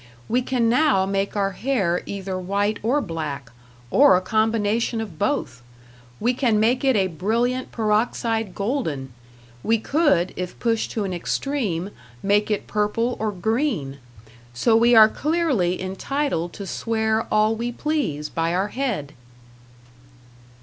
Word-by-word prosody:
We 245 +3 +1
can 245 -2 0
now 245 -5 +3
make 195 +1 -1
our 195 -1 +1
hair 195 -6 0
either 190 -2 -4
white 200 +3 -1
or 255 +7 +1
black, 150 - -5 0.4
or 285 -6 +6
a - - -1
combination 220 +3 0
of 195 -8 -6
both. 205 - -1 0.6
We 240 +3 +1
can 240 -4 +1
make 240 +5 +2
it 265 -2 +3
a 195 -2 +3
brilliant 230 +9 -1
peroxide 220 -1 0
golden; 165 - -2 0.5
we 225 - +2
could, 280 - +1
if 180 -1 -5
pushed 230 -2 0
to 215 - -1
an 190 -2 -3
extreme, 200 - -2 0.3
make 205 +2 +2
it 210 -2 -1
purple 215 +4 0
or 215 -1 -1
green. 205 - -1 0.6
So 225 - +3
we 235 +1 +5
are 220 -1 +9
clearly 275 - 0
entitled 190 - -2
to 200 - -7
swear 220 +2 -1
all 215 +1 +3
we 235 +2 -3
please 240 - -2
by 165 +2 -1
our 195 +3 0
head. 210 - -3
215 Hz, 140 wpm, -23 LUFS, 185-240 Hz, 0.6 s, are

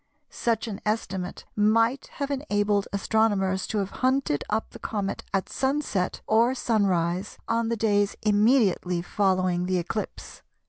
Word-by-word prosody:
Such 230 -1 -1
an 200 -3 -6
estimate 195 -4 -3
might 225 +5 +2
have 280 0 -3
enabled 205 -7 0
astronomers 200 -2 +1
to 220 - -2
have 195 -1 -1
hunted 260 - +1
up 220 +1 -1
the - - -11
comet 200 -3 -3
at 195 -1 0
sunset 265 -9 -1
or 235 +4 +3
sunrise 190 -6 0
on 230 0 0
the 230 - -1
days 205 -2 +2
immediately 205 -5 +3
following 185 -2 +1
the 185 0 +1
eclipse. 185 +5 -5
205 Hz, 135 wpm, -26 LUFS, 190-230 Hz, -, or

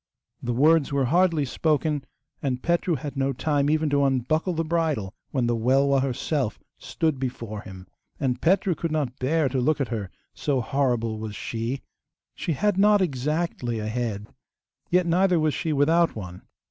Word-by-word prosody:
The 120 - -2
words 150 +2 +4
were 140 -1 +1
hardly 165 +1 +3
spoken, 150 +1 0 0.4
and 130 -3 -2
Petru 170 0 +1
had 145 0 -6
no 135 0 0
time 145 +1 +1
even 155 0 +2
to 140 0 +3
unbuckle 140 +7 +1
the 165 0 -1
bridle, 155 - -1 0.2
when 130 -3 0
the 120 0 +1
Welwa 135 +4 +3
herself 135 -2 -1 0.2
stood 160 -5 -1
before 115 -5 -4
him; 95 -2 -10 0.3
and 130 -3 -1
Petru 185 +2 +3
could 165 0 -3
not 140 -5 -2
bear 150 +3 +2
to 130 0 -1
look 155 +4 +1
at 140 - -1
her, 105 -5 -3 0.2
so 140 -3 0
horrible 120 -4 0
was 110 -1 -5
she. 115 +6 -4 0.5
She 165 - -2
had 205 +5 +1
not 210 +1 +5
exactly 150 -5 -1
a 105 - -3
head, 110 -3 -3 0.6
yet 180 0 +3
neither 180 +1 +3
was 155 -1 +1
she 160 - -2
without 160 +4 +3
one. 90 -4 -8
140 Hz, 170 wpm, -25 LUFS, 120-160 Hz, 0.6 s, not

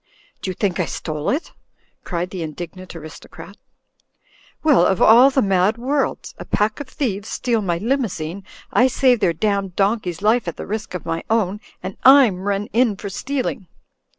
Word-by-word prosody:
"Do - - -4
you 185 - -4
think 190 -3 -1
I - - +1
stole 155 -1 -4
it?" 295 +6 -2 0.5
cried 175 0 -3
the 185 - -5
indignant 175 +3 -7
aris 155 -1 -9
tocrat. - - -12 1.1
"Well, 295 - +5
of 190 0 +2
all 240 +5 +7
the 270 -1 +1
mad 195 +2 +2
worlds! 270 +4 -2
A - - -7
pack 210 +1 0
of 290 - -6
thieves 205 -7 -3
steal 235 -3 0
my 175 -4 -1
Limousine, 200 - -2 0.3
I 250 - +5
save 255 -2 +3
their 190 -5 +2
damned 195 +1 -1
don 205 +4 +2
key's 180 -2 -6
life 220 -1 +2
at 170 - -4
the - - -6
risk 210 -2 -5
of 180 - -6
my 165 0 -3
own 210 -2 0
— - - -34
and 190 - -7
Fm 255 -9 +6
run 200 0 -1
in 235 -3 +3
for 200 +1 -7
stealing." 245 -2 -3
200 Hz, 185 wpm, -21 LUFS, 180-240 Hz, 1.1 s, all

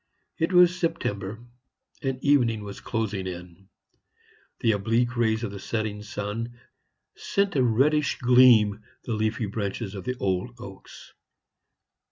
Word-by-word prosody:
It 165 +3 +1
was 180 0 +6
September, 115 - -3 0.6
and 135 -1 -2
evening 120 -7 +3
was 100 -1 -8
closing 110 -4 -3
in. 90 +1 -9 0.9
The 115 - +3
oblique 115 +4 0
rays 110 -1 +1
of 110 - -3
the 100 - -7
setting 110 0 -3
sun 105 +3 -5 0.6
sent 200 -2 -1
a 135 - +3
reddish 135 +5 +2
gleam 120 -4 +5 0.2
the 120 - -3
leafy 110 +1 -1
branches 100 0 -4
of 95 -3 -7
the 125 0 -3
old 95 +3 -2
oaks. 100 -5 -12
110 Hz, 130 wpm, -26 LUFS, 100-125 Hz, 0.9 s, was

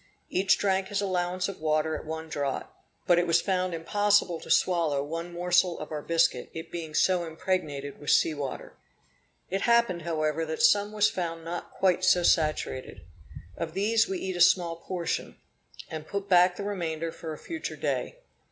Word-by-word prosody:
Each 190 +1 +3
drank 190 -1 +1
his 200 0 -2
allowance 185 -2 -1
of 195 - -7
water 155 0 +1
at - - -7
one 160 0 -5
draught, 145 -3 -2 0.4
but 175 -2 +4
it 175 - 0
was 165 0 +4
found 185 -1 -1
impossible 200 0 +2
to - - -12
swallow 165 -6 +2
one 165 +4 -5
morsel 180 0 +2
of 155 - -8
our 150 -1 -3
biscuit, 165 -6 +1
it 160 0 -7
being 160 -3 -6
so 180 -2 +3
impregnated 160 -4 -3
with 145 - -6
sea 160 - +4
water. 145 -3 -6 0.8
It 195 +1 -1
happened, 235 -7 +3
however, 155 -1 -1
that 160 +7 -3
some 205 -3 +4
was 210 0 +3
found 165 -5 -4
not 175 +1 -5
quite 185 -1 +1
so 180 -1 +4
saturated. 155 - 0 0.5
Of 165 0 -5
these 220 +3 +2
we 190 - -2
eat 185 0 -4
a 175 - -2
small 170 -1 +4
portion, 170 0 -4 0.5
and 155 -1 -6
put 200 0 -4
back 180 -1 +5
the 200 - -5
remainder 165 -5 -3
for 160 -1 -7
a - - -8
future 325 - -6
day. - - -3
175 Hz, 180 wpm, -28 LUFS, 160-190 Hz, 0.8 s, back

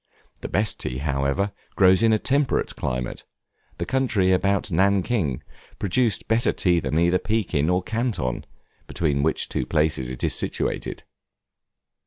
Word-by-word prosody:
The - - -6
best 105 +1 0
tea, 60 - -3
however, 70 +7 0 0.2
grows 95 0 +5
in 115 -1 +4
a 110 - +4
temperate 140 +5 0
climate, 60 -1 -3 0.5
the - - -3
country 120 -8 +1
about 100 +2 +1
Nankin 95 - +1 0.3
producing 105 +2 +1
better 115 +1 +2
tea 90 -2 +2
than 75 - -2
either 85 +2 +3
Pekin 95 -9 0
or 90 0 +1
Canton, 110 - -2 0.4
between 75 -4 0
which 80 +2 0
two - - -3
places 75 -5 +1
it 65 - -7
is - - +1
situated. - - -3
90 Hz, 140 wpm, -24 LUFS, 75-110 Hz, 0.5 s, grows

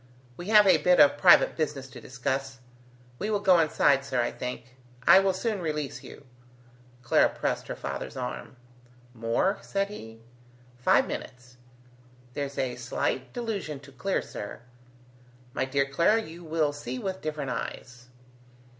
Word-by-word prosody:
We 175 - -8
have 210 -1 +7
a 185 -4 +6
bit 180 +3 +4
of 145 0 +6
private 180 -2 +6
business 145 -4 -3
to - - -11
discuss. 135 +1 -3 0.6
We 210 - -2
will 210 -2 +1
go 190 -4 +5
inside, 140 -3 +3
sir, 130 -2 -2
I 120 - +1
think. 125 0 -7 0.3
I 180 +3 +8
will 195 0 +2
soon 200 +1 -2
release 150 -4 -3
you." 140 - -12 0.8
Clara 120 - +4
pressed - - -3
her - - -4
father's - - -6
arm. 65 - -5 0.6
"More?" 120 - 0
said 200 0 -2
he. 115 - -10 0.6
"Five 125 - +4
minutes. 125 0 -8 0.8
There's 140 0 -4
a 125 -2 -2
slight 125 +1 -2
delusion 205 - -4
to 140 0 -14
clear, 190 +9 -2
sir. 100 - -8 0.9
My - - 0
dear 135 +1 +1
Clara, 170 +11 +3
you 170 0 -11
will 155 -2 0
see 130 -3 -6
with 190 +6 -4
different 150 -4 -3
eyes." 125 -1 -6
145 Hz, 150 wpm, -27 LUFS, 130-185 Hz, 0.9 s, I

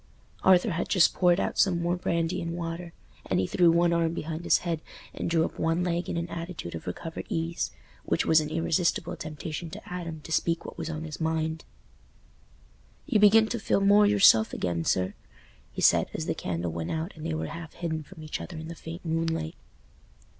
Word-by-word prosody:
Arthur 190 +2 +5
had 170 +1 -2
just 185 -5 +5
poured 180 0 +3
out - - -2
some 180 -3 +4
more 175 +1 0
brandy 170 0 -1
and 170 0 -4
water, 170 0 -5 0.4
and - - +1
he 95 - +1
threw 175 - +4
one 170 +1 +4
arm 165 -1 +1
behind 160 +1 -4
his - - +4
head 165 -2 -1 0.3
and - - -3
drew 165 -1 +3
up - - -7
one 165 +2 +1
leg 175 0 -1
in - - -2
an 170 0 -2
attitude 170 - -6
of 80 - -7
recovered 160 - -5
ease, 165 +1 -1 0.3
which - - 0
was 160 -1 +5
an 150 - -4
irresistible 165 +1 0
temptation 155 +2 -6
to 180 - -9
Adam 165 -3 -5
to 160 - -10
speak 165 +1 0
what - - -7
was 165 -1 -5
on 155 -1 -4
his 155 0 -7
mind. 160 0 -1 1.4
"You 220 - +2
begin 215 +2 +7
to 235 - -2
feel 200 - +1
more 205 +1 +6
yourself 195 - +6
again, 85 -2 -2
sir," 95 0 +1 0.6
he - - -4
said, - - +5
as - - -3
the - - 0
candle 85 -1 -3
went 80 0 -4
out 160 +4 -2
and 155 - -10
they 165 -1 -2
were 160 - -2
half 165 -2 -7
hidden 160 -2 -3
from 155 +2 -12
each 155 - -4
other 175 - -7
in 160 +1 -7
the - - -5
faint 165 +2 -9
moonlight. 165 - -1
165 Hz, 205 wpm, -28 LUFS, 160-175 Hz, 1.4 s, begin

